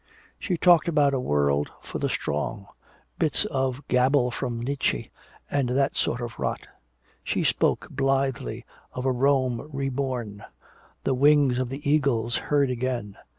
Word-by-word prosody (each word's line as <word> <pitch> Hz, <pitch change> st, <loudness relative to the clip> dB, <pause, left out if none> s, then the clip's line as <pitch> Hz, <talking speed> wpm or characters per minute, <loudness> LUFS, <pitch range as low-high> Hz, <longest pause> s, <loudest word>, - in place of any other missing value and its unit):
She 180 Hz, -3 st, -1 dB
talked 175 Hz, -1 st, +5 dB
about 145 Hz, -4 st, +3 dB
a 135 Hz, -, +1 dB
world 70 Hz, -, +1 dB
for -, -, -6 dB
the -, -, 0 dB
strong, 100 Hz, +8 st, -2 dB, 0.5 s
bits 160 Hz, +5 st, +1 dB
of 135 Hz, -5 st, -2 dB
gabble 125 Hz, 0 st, +3 dB
from 120 Hz, -1 st, -3 dB
Nietzsche 135 Hz, +3 st, -1 dB, 0.4 s
and 140 Hz, -3 st, +1 dB
that 135 Hz, +2 st, +1 dB
sort 120 Hz, -, 0 dB
of 120 Hz, -1 st, -6 dB
rot; -, -, -2 dB, 0.6 s
she -, -, -1 dB
spoke -, -, +1 dB
blithely 135 Hz, -, -1 dB, 0.3 s
of 125 Hz, -, -4 dB
a 130 Hz, -, +3 dB
Rome 130 Hz, 0 st, +1 dB
reborn, 130 Hz, -6 st, -3 dB, 0.6 s
the 135 Hz, -, +1 dB
"Wings 140 Hz, -1 st, +4 dB
of 130 Hz, -1 st, -1 dB
the 140 Hz, +2 st, -6 dB
Eagles" 130 Hz, -6 st, +2 dB
heard 140 Hz, -3 st, +1 dB
again. 120 Hz, -5 st, -3 dB
130 Hz, 145 wpm, -26 LUFS, 120-140 Hz, 0.6 s, talked